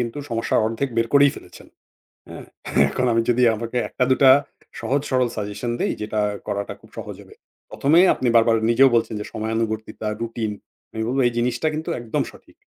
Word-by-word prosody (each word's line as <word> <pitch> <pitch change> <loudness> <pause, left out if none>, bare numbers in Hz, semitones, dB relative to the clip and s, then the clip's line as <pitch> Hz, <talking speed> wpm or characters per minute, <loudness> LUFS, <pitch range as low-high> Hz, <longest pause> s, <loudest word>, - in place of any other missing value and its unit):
কিন্তু 120 +4 -3
সমস্যা 115 0 0
অর্ধেক 115 +5 -2
বের 115 0 +2
করেই 140 0 +6
ফেলেছেন। - - -13 0.6
হ্যাঁ? - - -9 0.5
এখন 125 - -1
আমি 115 0 +2
যদি 125 +1 +2
আপনাকে 115 +2 -6
১ - - -25
টা 125 - +4
দুটা 130 0 +6 0.5
সহজ-সরল 130 -2 0
সাজেশন 105 +3 -4
দেই - - 0
যেটা 105 0 -2 0.3
করাটা 100 0 -3
খুব - - -19
সহজ - - -7
হবে। - - -17 0.4
১ম 140 - -2
এ - - +7
আপনি 125 - -1
বারবার 115 0 +4
নিজেও 135 +3 +6
বলছেন 115 -1 +1
যে 105 - -4
সময়ানুবর্তিতা, 110 0 -3
রুটিন 115 -2 -3 0.5
এবং 120 +3 -2
এই 120 - +3
জিনিসটা 120 +4 0
কিন্তু 155 +1 -5
একদম 115 -2 -2
সঠিক - - -20
115 Hz, 175 wpm, -22 LUFS, 110-125 Hz, 0.6 s, এ